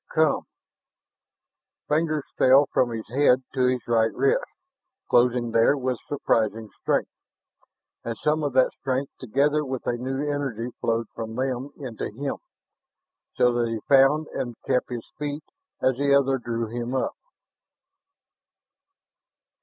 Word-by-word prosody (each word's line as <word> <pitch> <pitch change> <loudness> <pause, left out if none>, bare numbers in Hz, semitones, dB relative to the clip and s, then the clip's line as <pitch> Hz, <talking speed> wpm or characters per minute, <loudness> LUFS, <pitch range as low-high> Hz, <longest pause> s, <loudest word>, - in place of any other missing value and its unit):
"Come!" 155 -2 +2 1.5
Fingers 155 -1 +1
fell 135 +3 +6
from 125 - +3
his 115 -2 -5
head 130 0 +3
to 130 -2 +2
his 125 -2 -1
right 115 -1 +3
wrist, 485 +5 +2 0.6
closing 120 -1 +3
there 115 +6 +4
with 130 -2 -2
surprising 110 -6 0
strength; - - -1 0.8
and 115 -1 -4
some 155 +1 +1
of 145 -3 -1
that 130 0 +4
strength 135 +1 -2
together 140 +5 +1
with 130 -3 -5
a 120 - 0
new 130 +3 -3
energy 135 -5 -3
flowed 115 0 0
from 110 -1 -6
them 130 +1 -2
into 125 -6 -5
him, 135 +6 -4 1.0
so 125 0 +3
that 120 -1 +1
he 115 -1 -3
found 140 +3 +5
and 120 -2 -4
kept 125 - +1
his 120 -2 -5
feet 145 0 -3 0.4
as 130 -1 +3
the 140 0 +3
other 135 -1 +2
drew 115 -1 -2
him 120 +3 -4
up. 130 - 0
130 Hz, 135 wpm, -25 LUFS, 120-140 Hz, 1.5 s, fell